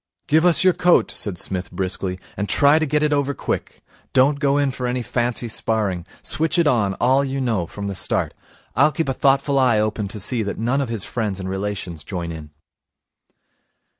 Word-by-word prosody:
'Give 160 +3 +4
us 175 - +4
your 185 -1 +5
coat,' 175 0 +3
said 100 -4 -4
Psmith 95 -1 -2
briskly, 95 0 -3 0.2
'and 100 +1 -3
try 145 +2 +5
and 155 -2 0
get 150 +1 +1
it 150 -1 +2
over 140 -1 0
quick. - - -4 0.3
Don't 140 +2 +4
go 140 -1 +2
in 140 -2 +2
for 125 -1 -4
any 125 0 -1
fancy 120 0 -1
sparring. 105 -6 -1 0.2
Switch 160 +3 0
it 170 - +4
on, 110 -9 +2
all 130 +3 +3
you 135 0 -3
know, 110 -10 0
from 100 +2 -7
the 100 - -3
start. 95 - 0 0.4
I'll 155 - +4
keep 160 -1 -2
a - - +1
thoughtful 140 +1 +2
eye 125 -4 +4
open 105 -1 -1
to 105 +2 -6
see 115 +4 0
that 100 -2 -3
none 125 +5 0
of 135 - -3
his 110 -4 -3
friends 105 -5 -3
and 95 - -5
relations 95 -4 -4
join 85 0 -5
in.' 80 -2 -8
120 Hz, 200 wpm, -21 LUFS, 100-140 Hz, 0.4 s, your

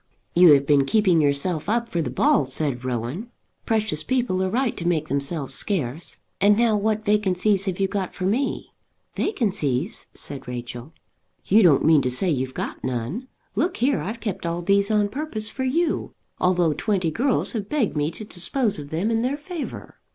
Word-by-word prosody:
"You 175 -3 +8
have 140 -1 +3
been 140 -1 +3
keeping 185 -3 +3
yourself 150 +4 0
up 235 +1 +1
for 170 -7 -1
the - - -2
ball," 145 - +3
said 130 -1 -1
Rowan. 130 - -3 0.4
"Precious 215 -8 +1
people 245 -8 0
are 190 - 0
right 245 +3 0
to 170 - -3
make 155 -3 0
themselves 140 0 -1
scarce. 150 - -2 0.2
And 205 +1 +5
now 230 -2 +3
what 215 +1 0
vacancies 200 -1 +2
have 190 -2 -3
you 195 - +2
got 195 -2 -3
for 185 - -3
me?" 245 +8 -1 0.4
"Vacancies!" 190 - -1
said 135 -2 -3
Rachel. 120 +2 -6 0.5
"You 215 +4 +5
don't 165 -8 +5
mean 155 -2 +6
to 125 - 0
say 170 +9 +2
you've 130 -2 -2
got - - -5
none. 130 - -3 0.3
Look 350 +5 0
here, 265 +2 +2
I've 220 +4 -5
kept 205 -6 -4
all 170 +1 -2
these 200 +2 +3
on 210 -1 +2
purpose 220 -3 -4
for 260 - -3
you, 315 +5 0 0.2
although 180 -3 +2
twenty 180 +1 0
girls 255 - +1
have 210 -3 -4
begged 275 - 0
me 150 0 +1
to 215 +6 -8
dispose 205 - -1
of 145 -1 -8
them 175 +9 -1
in 225 0 +1
their 260 +4 -1
favour." 315 +1 -7
185 Hz, 185 wpm, -23 LUFS, 150-220 Hz, 0.5 s, You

